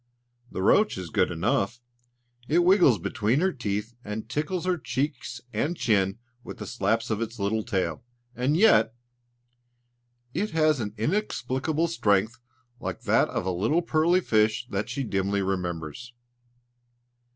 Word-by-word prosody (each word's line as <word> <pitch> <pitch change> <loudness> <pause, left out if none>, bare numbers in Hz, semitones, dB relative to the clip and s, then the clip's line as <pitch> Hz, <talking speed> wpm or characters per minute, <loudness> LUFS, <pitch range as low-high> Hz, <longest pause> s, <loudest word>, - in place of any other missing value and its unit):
The 95 - -4
roach 210 - +4
is 90 -4 -6
good 90 - +2
enough! 100 +6 0 0.7
It 170 +4 +3
wriggles 180 - +5
between 105 - 0
her 190 +3 +2
teeth 105 -2 -3
and 105 0 -5
tickles 155 +7 -2
her 180 -2 +1
cheeks 130 -2 -3
and 145 +11 -1
chin 95 -3 +1 0.3
with - - -9
slaps 115 0 0
of 110 0 -1
its 115 +1 -4
little 105 +2 0
tail; 105 -4 -2 0.3
and 135 +5 +1
yet... 195 - +5 1.4
it 200 +7 -1
has 155 -3 +3
an 105 -2 -4
inexplicable 155 - -1
strength 110 -6 +1 0.4
like - - -5
that - - +3
of - - -3
a 95 - 0
little 110 - +1
pearly 170 +3 +3
fish 110 -3 +2
that 100 +1 -2
she 140 - -2
dimly 100 -2 0
remembers. 90 +4 -4
115 Hz, 140 wpm, -26 LUFS, 100-155 Hz, 1.4 s, wriggles